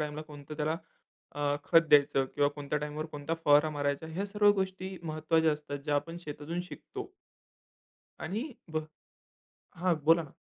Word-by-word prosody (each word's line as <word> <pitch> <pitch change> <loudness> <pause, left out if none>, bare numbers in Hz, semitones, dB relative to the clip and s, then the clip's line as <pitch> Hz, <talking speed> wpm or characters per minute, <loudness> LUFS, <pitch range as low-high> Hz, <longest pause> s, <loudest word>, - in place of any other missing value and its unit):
टाईमला 150 0 -3
कोणतं 150 -1 -10
त्याला 155 +1 0 0.6
अ, 145 0 +1
खत 165 - +7
द्यायचं 140 -2 +5
किंवा 145 0 +4
कोणत्या 145 0 -2
टाईमवर 150 +1 -4
कोणता 150 +1 -3
फवारा 150 +1 +6
मारायचा. 145 +1 -1
ह्या 175 +5 -3
सर्व 205 0 +5
गोष्टी 190 -1 -3
महत्त्वाच्या 160 0 +2
असतात 150 -1 -5
ज्या 150 -1 +1
आपण 165 +4 -1
शेतातून 150 +2 -4
शिकतो. 395 - -8 1.1
आणि 240 +9 -3 0.2
बह 155 0 -1 1.0
हां, 180 -2 +3
बोला 165 +1 +6
ना. 150 - -12
155 Hz, 150 wpm, -31 LUFS, 145-170 Hz, 1.1 s, खत